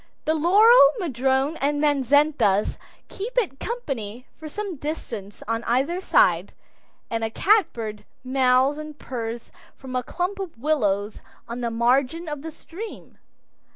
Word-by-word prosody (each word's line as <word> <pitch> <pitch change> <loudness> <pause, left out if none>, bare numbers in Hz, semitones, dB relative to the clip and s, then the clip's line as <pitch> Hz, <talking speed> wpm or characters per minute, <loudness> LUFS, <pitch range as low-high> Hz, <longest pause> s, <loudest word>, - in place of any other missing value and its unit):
The 315 - +2
laurel, 355 - +6
madrone, 270 - 0
and 290 +1 0
manzanitas 285 -7 +2 0.3
keep 455 +6 -7
it 375 - 0
company 255 - -5
for 315 -1 -9
some 395 0 -5
distance 230 -9 -6
on 230 +1 -1
either 275 +10 0
side, 180 - +3 0.6
and 225 0 -1
a 225 - 0
catbird 230 - +1 0.2
mews 260 +2 +2
and 305 -1 -8
purrs 235 -3 -6 0.2
from 260 -1 -8
a 250 - +1
clump 365 +9 -3
of 370 -9 -6
willows 215 -7 0 0.3
on 235 +1 -5
the 235 - -1
margin 255 +8 +1
of 295 -2 -5
the 320 - -6
stream. 350 +7 -10
275 Hz, 135 wpm, -24 LUFS, 235-325 Hz, 0.6 s, laurel